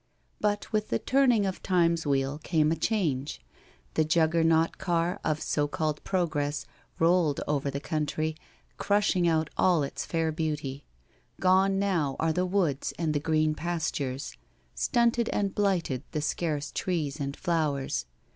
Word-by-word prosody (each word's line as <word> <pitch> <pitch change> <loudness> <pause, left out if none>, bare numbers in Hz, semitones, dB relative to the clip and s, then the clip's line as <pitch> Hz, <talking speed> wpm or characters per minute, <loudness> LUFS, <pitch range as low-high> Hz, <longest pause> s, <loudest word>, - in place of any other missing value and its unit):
But 205 +1 -1
with 215 0 0
the - - +1
turning 255 -6 +3
of 190 -1 -3
Time's 170 -3 +2
wheel 140 +1 0
came 155 -1 +1
a - - +2
change. 155 - -1 0.5
The 155 - +3
Juggernaut 165 0 +2
car 175 0 0
of 155 0 -1
so 145 -1 0
called 155 0 -2
progress 150 -6 -1 0.3
rolled 165 -3 +3
over 145 -1 0
that 140 +1 -5
country, 155 0 -1 0.4
crushing 200 -3 +2
out 160 -2 +1
all 175 -5 +3
its 140 - -4
fair 165 -1 -1
beauty. 150 -4 -3 0.5
Gone 190 +1 +4
now 175 -9 0
are 160 0 +1
the 180 +2 0
woods 180 -8 0
and 160 -2 0
the 145 - +1
green 155 0 +1
pastures. 155 -5 -3 0.4
Stunted 235 -1 +2
and 200 -2 -1
blighted 180 -11 0
the 150 - -1
scarce 150 -1 -2
trees 155 -5 -2
and 140 0 -3
flowers. 155 - -1
160 Hz, 145 wpm, -28 LUFS, 150-185 Hz, 0.5 s, Gone